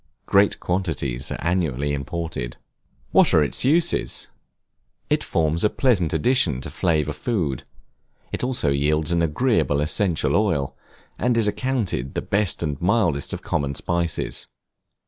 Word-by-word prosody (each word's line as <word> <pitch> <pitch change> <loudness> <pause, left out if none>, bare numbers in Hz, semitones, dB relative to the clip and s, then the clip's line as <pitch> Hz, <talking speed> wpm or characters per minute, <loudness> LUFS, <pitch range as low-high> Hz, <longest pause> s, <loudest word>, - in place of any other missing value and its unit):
Great 100 +1 +3
quantities 80 -9 -2
are - - -3
annually 75 -6 0
imported. 70 -4 -4 0.5
What - - +5
are 80 - +5
its 70 - -1
uses? 165 +6 +2 0.8
It - - +2
forms 80 0 0
a 105 - +4
pleasant 105 - +1
addition 80 - +2
to - - -6
flavor 75 -4 0
food; 85 - -2 0.7
it - - -3
also 125 - 0
yields 75 +3 +1
an 85 -1 +2
agreeable 85 - +1
essential 80 +3 +1
oil, 90 -10 0 0.4
and 120 0 +1
is 110 -2 +3
accounted 105 - -2
the - - -1
best 100 -4 0
and 75 -4 -3
mildest 85 -7 +1
of - - -5
common 70 -1 -1
spices. 85 +1 -1
85 Hz, 135 wpm, -23 LUFS, 75-105 Hz, 0.8 s, What